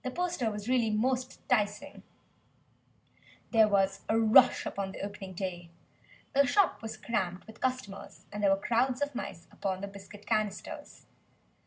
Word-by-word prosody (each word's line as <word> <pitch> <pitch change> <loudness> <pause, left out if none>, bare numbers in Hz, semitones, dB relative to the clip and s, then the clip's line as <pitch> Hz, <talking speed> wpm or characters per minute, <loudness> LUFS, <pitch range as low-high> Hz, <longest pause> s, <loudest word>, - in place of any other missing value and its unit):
The 255 - -2
poster 345 -5 -1
really 225 +3 +1
was 210 - 0
most 255 +2 -1
'ticing. 210 -4 0 1.5
There 220 -2 +6
was 195 -1 +2
a 225 - +3
rush 225 +3 +6
upon 195 -1 -3
the - - -7
opening 200 -1 -6
day. 175 -2 -4 0.6
The 280 0 +5
shop 390 +6 +3
was 225 -1 -6
crammed 185 -6 -2
with 220 0 -14
customers, 255 -7 -4
and 210 - -4
there 200 - +4
were 195 - +4
crowds 250 +5 +1
of 285 0 -3
mice 185 -8 -6
upon 190 -1 -3
the 200 - -3
biscuit 200 +1 -12
canisters. 215 -3 -3
215 Hz, 155 wpm, -30 LUFS, 195-250 Hz, 1.5 s, There